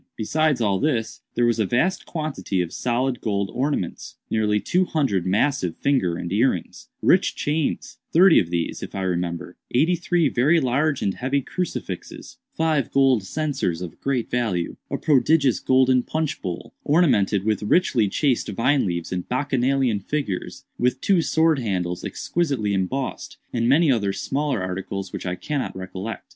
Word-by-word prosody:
Besides 150 +4 +1
all 100 -3 +1
this, 120 -7 -1
there 120 - +3
was 120 -1 +1
a 110 - +2
vast 170 - 0
quantity 155 - -3
of 90 -1 -2
solid 125 +1 -1
gold 100 -3 -1
ornaments; 130 - -2 0.2
nearly 105 -1 +2
two 180 - +1
hundred 130 - 0
massive 100 - +1
finger 110 -12 +1
and 85 +1 -4
earrings; 105 -5 -1
rich - - +3
chains—thirty 160 +3 +2
of 85 - -1
these, 85 -1 -2
if - - -7
I 95 - -2
remember; 90 -1 -3
eighty 155 +8 +3
three 175 -2 +1
very 140 +7 +3
large 140 +2 +1
and 100 - +1
heavy 135 +6 -1
crucifixes; 185 - -5
five 160 - 0
gold 135 -4 +4
censers 115 - -2
of 90 -2 -8
great 130 -4 -1
value; 110 -9 -1
a - - -2
prodigious 140 -1 +3
golden 130 -1 +3
punch 155 +3 -3
bowl, 90 -3 -6
ornamented 120 - +3
with 110 -1 0
richly 110 - +2
chased 130 +2 0
vine 115 +5 +1
leaves 85 -1 -3
and 90 -1 -4
Bacchanalian 130 -3 +1
figures; 105 -4 -4
with 125 +1 +1
two 190 +1 +3
sword 160 -2 +2
handles 90 -6 -2
exquisitely 140 -12 -1
embossed, 115 +8 -3 0.2
and 115 0 +1
many 150 +2 +5
other 100 -5 +1
smaller 140 -6 -1
articles 95 +1 -4
which - - -5
I 90 - -1
cannot 140 +1 -3
recollect. 95 +4 -6
125 Hz, 155 wpm, -23 LUFS, 95-145 Hz, 0.2 s, many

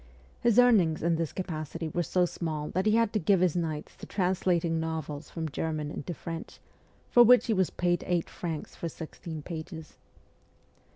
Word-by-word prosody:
His 235 -2 +3
earnings 205 -12 +5
in 165 0 +2
this 165 -2 -2
capacity 165 -2 -4
were 175 +3 -1
so 180 +2 +2
small 155 -3 -3
that 185 +4 0
he 215 - +4
had 230 -1 +2
to 215 - +2
give 195 +2 +3
his 180 -2 +2
nights 160 -3 -3
to - - -10
translating 180 -3 +1
novels 160 -2 -4
from 165 -1 -4
German 155 0 -3
into 165 +4 -5
French, 165 +1 -7 0.5
for 240 - +7
which 245 +1 +7
he 225 - +1
was 190 -3 +2
paid 175 0 0
eight 175 -2 +1
francs 165 -4 -5
for 170 - -4
sixteen 160 -1 -8
pages. 160 -1 -8
170 Hz, 175 wpm, -29 LUFS, 160-185 Hz, 0.5 s, for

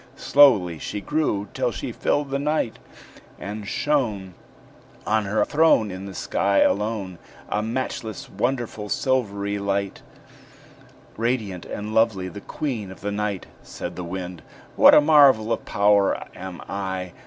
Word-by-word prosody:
Slowly 105 - +4
she 105 - -4
grew 105 -5 -1
till - - 0
she - - -5
filled 145 -1 -1
the 140 - 0
night, 150 -5 -1 0.6
And 105 +1 -6
shone 110 -10 -1 0.7
On 110 -1 +1
her 105 +1 +1
throne 150 -9 +3
In 95 +2 -7
the 95 - -9
sky 100 +2 +1
alone, 100 -4 0 0.3
A 105 - 0
matchless, 115 -2 -4
wonderful 115 -1 -3
silvery 100 -7 -1
light, 100 0 -2 1.2
Radiant 110 -6 -2
and 105 +1 -5
lovely, 110 -5 +2
the 100 - -9
queen 120 -9 -4
of 95 - -12
the 105 - -3
night. 105 -2 -2 0.2
Said - - -7
the 90 - -5
Wind: 90 0 -6 0.3
"What - - +8
a - - +8
marvel 140 -7 +5
of - - -5
power 100 -1 +2
am 90 -1 -8
I! 95 -2 -4
105 Hz, 140 wpm, -23 LUFS, 100-120 Hz, 1.2 s, What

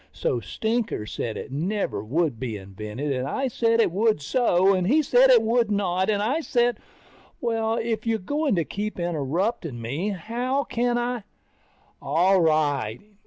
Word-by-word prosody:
So 485 - -1
Stinker 225 - -2
said 110 +1 -4
it - - -7
never 175 - -2
would 140 +1 -1
be 115 -4 -3
invented, 105 +8 -5
and 130 0 -2
I 270 - -1
said 230 -1 +1
it 225 - +3
would 215 +2 +2
so, 190 - +3
and 185 -1 0
he 305 +7 +4
said 260 -1 +5
it 240 -3 +6
would 230 0 +2
not, 190 -2 0
and 205 -1 +1
I 270 +9 0
said... 240 -5 +1 0.6
Well, 225 -1 0
if 230 0 -2
you're 225 -1 +2
going 285 +6 -1
to 170 -3 0
keep 210 -1 -4
interrupting 165 - -2
me, 140 - -3
how 240 - -2
can 240 -1 0
I... 240 0 -2 0.8
All 190 +3 +3
right. 145 -8 +1
205 Hz, 165 wpm, -25 LUFS, 155-235 Hz, 0.8 s, it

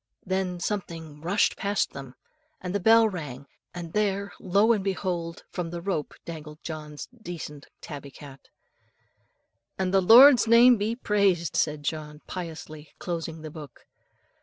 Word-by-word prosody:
Then 185 -1 -1
something 165 -7 -5
rushed 185 +6 +2
past 200 0 -1
them, 135 -2 -9 0.4
and 180 0 -5
the 200 - 0
bell 225 +3 +6
rang, 145 - -6 0.3
and 175 -2 -8
there, 200 -1 0
lo, 200 +5 +3
and 205 -4 -1
behold! 180 -3 -3
from 175 -2 -4
the 170 +1 -5
rope 170 -4 -3
dangled 155 -2 -9
John's 150 -2 -7
decent 155 -7 -8
tabby 145 -2 -8
cat. 135 -1 -13 1.3
"And 190 -1 -1
the 195 - +5
Lord's 240 +5 +8
name 235 +2 +7
be 215 +3 -1
praised," 200 -8 +1
said 150 -1 0
John 150 -1 -4
piously, 160 -4 -8
closing 165 -2 -5
the 155 - -7
book. 145 -5 -11
175 Hz, 140 wpm, -26 LUFS, 155-200 Hz, 1.3 s, Lord's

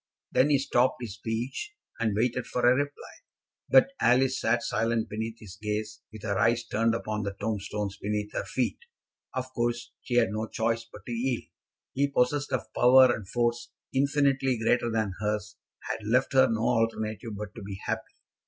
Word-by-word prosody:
Then 135 +3 +4
he 145 - +5
stopped 130 -1 +2
his 115 -5 -5
speech, 120 - -4 0.2
and 110 -3 +1
waited 120 +2 0
for 125 - -2
a 125 - +7
reply; 145 +2 -3 0.6
but - - +6
Alice 130 +2 +3
sat 115 +1 +2
silent 115 0 0
beneath 110 +2 -4
his 100 -3 -12
gaze, 105 0 -3
with 110 -2 -11
her 100 -3 -1
eyes 120 0 +3
turned 115 +1 +1
upon 110 -1 -3
the 100 -1 -4
tombstones 105 -1 -3
beneath 105 0 -2
her - - -1
feet. 130 - -1 0.6
Of 130 0 -4
course 120 0 -1
she 120 - -3
had 115 -5 +4
no 110 +1 -2
choice 115 +1 -1
but 105 - -12
to - - -6
yield. 120 +1 -1 0.5
He, 140 +2 +2
possessed 140 +1 +1
of 110 -4 -3
power 130 0 +7
and 100 -4 -9
force 120 0 0 0.2
infinitely 135 -1 +2
greater 115 +1 +2
than 110 -4 0
hers, 105 0 -2 0.3
had - - -2
left 125 +6 +2
her 130 -1 +6
no 115 0 0
alternative 115 -2 -1
but 105 -1 -6
to 115 - -9
be 100 -1 -7
happy. - - -3
115 Hz, 180 wpm, -28 LUFS, 105-125 Hz, 0.6 s, a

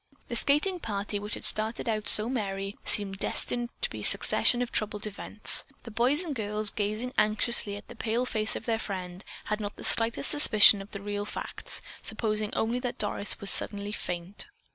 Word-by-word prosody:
The 240 - -3
skating 300 - +3
party, 205 -4 -4
which 210 +1 -6
had - - -8
started 220 +3 +3
out 215 -1 -1
so 215 +1 +6
merrily, 195 -5 -3
seemed 195 -2 +2
destined 240 +3 -1
to - - +1
be - - -6
a - - -7
succession 245 0 +2
of 245 - -7
troubled 210 0 0
events. 210 0 +3 0.2
The 230 - -9
boys 255 +9 +3
and 325 -4 -4
girls, 210 -3 0
gazing 215 +4 -3
anxiously 215 -1 +1
at 205 - -13
the 240 - -11
pale 230 +2 -1
face 215 -3 -1
of - - -6
their 225 -2 0
friend, 185 -2 -6 0.2
had 210 0 -2
not 205 -1 -5
the - - -11
slightest 230 +4 0
suspicion 215 -8 +5
of 195 - -11
the 200 -1 -8
real 205 0 -3
facts, - - -3 0.2
supposing 215 -1 -2
only 230 +3 0
that 245 -1 -4
Doris 205 -1 -2
was 200 - +4
suddenly 205 0 +2
faint. 180 -1 -5
215 Hz, 190 wpm, -28 LUFS, 205-235 Hz, 0.2 s, so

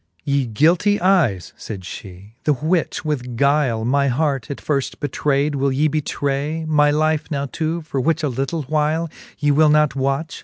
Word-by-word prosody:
XXV. 80 +1 -42
Ye 140 -1 +1
guilty 170 - +3
eyes, 160 - +2
fayd 100 -3 -7
fhe, 95 +2 -10
the 150 - +4
which 155 +6 -1
with 125 -6 -3
guyle 140 -5 +2
My 140 +3 +2
heart 135 -2 0
at 140 - -4
firft 140 -3 -2
betrayd, 145 +1 0
will 140 0 0
ye 145 +4 +2
betray 150 +1 -2
My 150 -1 +4
life 155 +1 +1
now 140 -2 -2
to, 165 +1 -2
for 140 -4 -3
which 160 +3 0
a - - +2
little 135 +4 -2
whyle 155 +3 0 0.3
Ye 145 0 +2
will 155 +2 +5
not 150 -2 +3
watch 140 +3 -2
145 Hz, 180 wpm, -20 LUFS, 135-155 Hz, 0.3 s, will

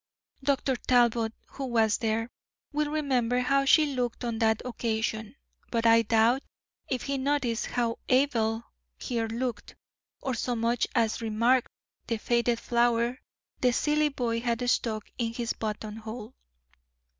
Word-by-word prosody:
Dr. 270 -2 +1
Talbot, 235 -3 +3
who 275 - -6
was 225 -3 +2
there, 225 +1 -1 0.4
will 300 0 0
remember 255 -5 +1
how 275 +2 +2
she 305 +3 +6
looked 250 -4 -2
on 230 -2 -2
that 220 -1 +3
occasion; 220 -1 -2 0.3
but 230 -1 0
I 230 0 +7
doubt 230 +4 +3 0.5
if 255 - -1
he 275 -1 -2
noticed 260 -4 0
how 235 -2 -1
Abel 235 -4 +2 0.3
here 230 -2 -2
looked, 240 +2 -4 0.4
or 260 - -2
so 245 +1 -1
much 230 +1 +1
as 230 -1 +1
remarked 230 +3 +2 0.4
the 230 - 0
faded 235 +1 +1
flower 235 +1 +1 0.4
the 250 - +3
silly 300 +4 +2
boy 240 -4 -1
had 240 0 -1
stuck 215 -3 -1
in 230 -1 -1
his 235 -1 -2
buttonhole." 220 +2 -6
235 Hz, 135 wpm, -28 LUFS, 225-255 Hz, 0.5 s, I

